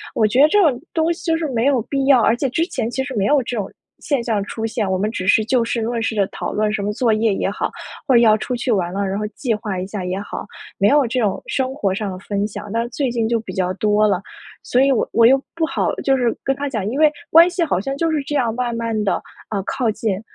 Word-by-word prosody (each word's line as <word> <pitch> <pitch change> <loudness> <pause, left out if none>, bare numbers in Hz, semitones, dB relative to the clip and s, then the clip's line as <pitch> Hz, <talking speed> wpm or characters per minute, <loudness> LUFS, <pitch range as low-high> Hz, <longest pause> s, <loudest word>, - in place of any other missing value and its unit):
我 220 - +3
觉 245 +6 +3
得 295 - +8
这 415 +7 +3
种 285 -9 +3
东 325 +1 +1
西 335 - -12
就 325 - +3
是 325 - -2
没 240 -1 0
有 270 -4 +3
必 275 +2 -2
要， 265 -4 +6
而 225 - +3
且 265 +2 -1
之 325 +7 0
前 235 - -3
其 265 +2 -2
实 265 - -6
没 200 - +1
有 290 +2 +3
这 240 - -4
种 200 -3 -3 0.3
现 280 -5 -1
象 215 -4 0
出 225 +1 -4
现。 220 -3 -2
我 190 - +1
们 210 +3 0
只 185 -4 -4
是 215 +2 +4
就 245 0 +2
事 235 - -1
论 230 +1 -2
事 225 0 -1
地 200 - +2
讨 - - -5
论 210 0 0
什 210 - -1
么 205 - -1
作 230 0 +2
业 215 -1 +2
也 - - -1
好， - - -2 0.4
或 260 - +4
者 - - +7
要 220 -2 +5
出 250 +3 -3
去 240 0 -2
玩 180 -4 0
了， 200 +1 -1
然 195 +1 -2
后 210 - -2
计 245 -5 -1
划 210 -3 -4
一 180 - -3
下 200 -2 -5
也 185 +1 -2
好。 205 - -6 0.4
没 200 - +4
有 290 -1 +4
这 230 +3 -1
种 210 -5 0
生 265 -1 -1
活 195 -9 0
上 200 0 -3
的 185 - -6
分 200 +1 -2
享， 210 0 -8
那 230 +1 -1
最 265 0 -1
近 230 -2 0
就 235 -1 +1
比 205 -4 -8
较 185 -1 0
多 210 +1 +2
了。 195 -3 +1 0.4
所 250 - +2
以 275 - +3
我 250 - +1
我 230 0 +5
又 265 +2 +4
不 330 -1 +1
好， - - -1
就 270 -1 +3
是 240 -3 +1
跟 270 - 0
他 285 +1 -3
讲， 215 -6 -3
因 265 +6 -3
为 310 -1 +5 0.2
关 335 +2 +8
系 355 -1 -1
好 290 - 0
像 270 +5 -3
就 330 +2 0
是 305 -2 0
这 295 +1 -4
样 240 -5 +1
慢 240 0 -2
慢 230 -2 -2
地 200 - +1 0.4
啊， 205 -3 -2
靠 245 -4 -1
近。 205 -2 -2
230 Hz, 310 characters per minute, -20 LUFS, 210-270 Hz, 0.4 s, 得